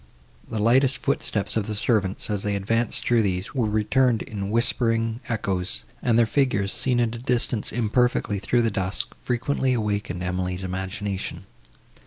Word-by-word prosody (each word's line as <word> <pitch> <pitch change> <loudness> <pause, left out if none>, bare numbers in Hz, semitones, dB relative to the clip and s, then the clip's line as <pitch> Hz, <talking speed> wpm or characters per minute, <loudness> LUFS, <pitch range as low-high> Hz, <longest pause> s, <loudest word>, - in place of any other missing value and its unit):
The 110 - -3
lightest 125 +5 +3
footsteps 110 -7 -1
of 110 -3 0
the 105 - -3
servants, 105 -3 0
as 105 -2 -1
they 100 0 -1
advanced 115 +4 0
through 120 -2 +4
these, 95 -2 -2
were 120 -6 +1
returned 110 +3 +2
in 100 -2 -5
whispering 115 0 +1
echoes, 100 -2 -1 0.2
and 115 -2 +2
their 120 - +5
figures, 110 -6 +1
seen 125 -2 +1
at 115 -1 +1
a 120 - -6
distance 120 -3 +1
imperfectly 120 -2 +1
through 120 +4 +1
the 115 - +1
dusk, 95 -1 -2
frequently 130 +2 0
awakened 105 -5 -2
Emily's 90 +1 -2
imagination. 95 +2 -4
110 Hz, 155 wpm, -24 LUFS, 100-120 Hz, 0.2 s, their